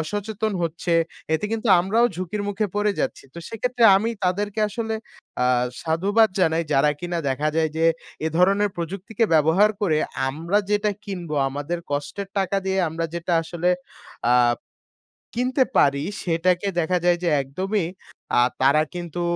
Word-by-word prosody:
অসচেতন 205 +6 -3
হচ্ছে 170 +1 -2 0.4
এতে 160 - -1
কিন্তু 225 +1 -2
আমরাও 220 +7 +3
ঝুঁকির 185 +3 -3
মুখে 205 +1 -1
পড়ে 205 0 +2
যাচ্ছি। - - -3
তো - - -8
সেক্ষেত্রে 245 +1 0
আমি 220 +4 0
তাদেরকে 205 +3 -1
আসলে 220 +1 -3 0.4
অ্যা 125 - +2 0.3
সাধুবাদ 195 +7 +3
জানাই 165 -1 +2
যারা 145 +1 +4
কিনা 175 -1 -3
দেখা 145 +3 0
যায় 160 -1 +2
যে, 165 - +2 0.4
এ - - +2
ধরনের 200 +3 +3
প্রযুক্তিকে 195 +6 -2
ব্যবহার 160 +7 +4
করে 165 -7 +2 0.3
আমরা 165 +8 0
যেটা 210 0 +2
কিনব, 180 -5 -6 0.2
আমাদের 145 +5 -4
কষ্টের 145 +8 -3
টাকা 195 0 0
দিয়ে 190 0 0
আমরা 165 +1 -3
যেটা 170 +1 -2
আসলে 170 +2 -1 0.6
আ - - +5 1.0
কিনতে 255 +3 +2
পারি, 140 0 +3 0.2
সেটাকে 175 +3 +1
দেখা 175 +2 +1
যায় 175 0 +4
যে 175 - +2
একদমই 185 +8 -2 0.5
আ - - +6 0.2
তারা 140 +3 +5
কিন্তু 175 -1 -5
180 Hz, 150 wpm, -23 LUFS, 160-205 Hz, 1.0 s, আ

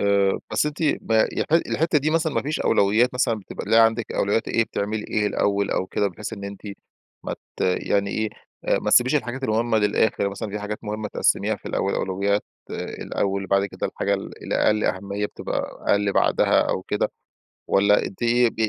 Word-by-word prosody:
آآ 100 -1 +2
بس 110 - +2
أنتِ 150 0 -4 0.2
ما 110 -1 +2
يح - - -1
الحتّة 165 -1 +2
دي 150 +2 0
مثلًا 160 -1 +1
ما - - +1
فيش 150 +3 -2
أولويات 115 +6 +3
مثلًا، 120 -2 +2
بتبقى 95 - -8
اللي 110 +3 +3
هي 115 - +8
عندِك 115 0 +2
أولويات 105 +3 0
إيه، 115 - +2
بتعملي 105 +1 -3
إيه 105 -1 +1
الأول، 100 -1 0
أو 95 - 0
كده، 100 +1 0
بحيث 100 +5 -7
إن 100 -3 -6
أنتِ 100 0 -8 0.6
ما - - -3 0.2
ت - - -14
يعني 100 +2 +1
إيه، 110 +1 -1 0.5
ما - - -1
تسيبيش 130 +4 +5
الحاجات 130 -1 -3
المهمة 110 0 +1
للآخر، 105 -1 +2
مثلًا 100 +2 -5
في 105 - -3
حاجات 105 +1 -4
مهمة 105 0 -3
تقسميها - - +1
في - - -15
الأول، - - -1
أولويات 100 +2 0 0.3
آآ - - -4 0.2
الأول، 100 0 -1
وبعد 100 +1 +2
كده - - -4
الحاجة 100 0 -1
ال 95 - -7
الأقل 105 0 +1
أهمية 100 +2 -1
بتبقى - - -4 0.3
أقل 100 -1 +2
بعدها، - - +3
أو - - -1
كده، - - -1 0.6
والّا 100 +1 +4
أنتِ 95 - -9
ب 120 0 +3
105 Hz, 190 wpm, -23 LUFS, 100-115 Hz, 0.6 s, هي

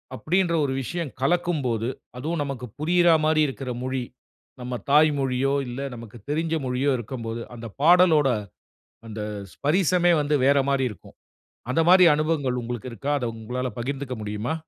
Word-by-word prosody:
அப்படீன்ற 175 +4 0
ஒரு 135 - -1
விஷயம் 165 +2 -4
கலக்கும்போது 135 -8 0 0.3
அதுவும் 155 +5 -2
நமக்கு 135 -3 -5
புரியற 175 +2 +3 0.2
மாரி 155 0 +3
இருக்குற 135 -1 -6
மொழி 130 -1 -2 0.6
நம்ம 125 0 -4 0.2
தாய் 155 +2 +6
மொழியோ 135 0 0
இல்ல 120 +2 -6 0.2
நமக்கு 115 0 -11
தெரிஞ்ச 160 +2 -1
மொழியோ 130 +3 0
இருக்கும்போது 115 -1 -5
"அந்த 115 0 -7
பாடலோட 165 -3 +5 0.8
அந்த 110 -1 -7 0.3
ஸ்பரிசமே 175 +3 +2
வந்து 150 +1 0
வேற 140 +1 +5
மாரி 135 -1 +2
இருக்கும்." 105 - -14 0.5
அந்த 130 - +2
மாரி 185 0 +8
அனுபவங்கள் 145 -5 0
உங்களுக்கு 120 +1 -5
இருக்கா? 135 +6 -4
அத 130 - -4
உங்களால 125 +3 -3
பகிர்ந்துக்க 135 +1 -4
முடியுமா? 105 +7 -3
135 Hz, 145 wpm, -24 LUFS, 125-155 Hz, 0.8 s, மாரி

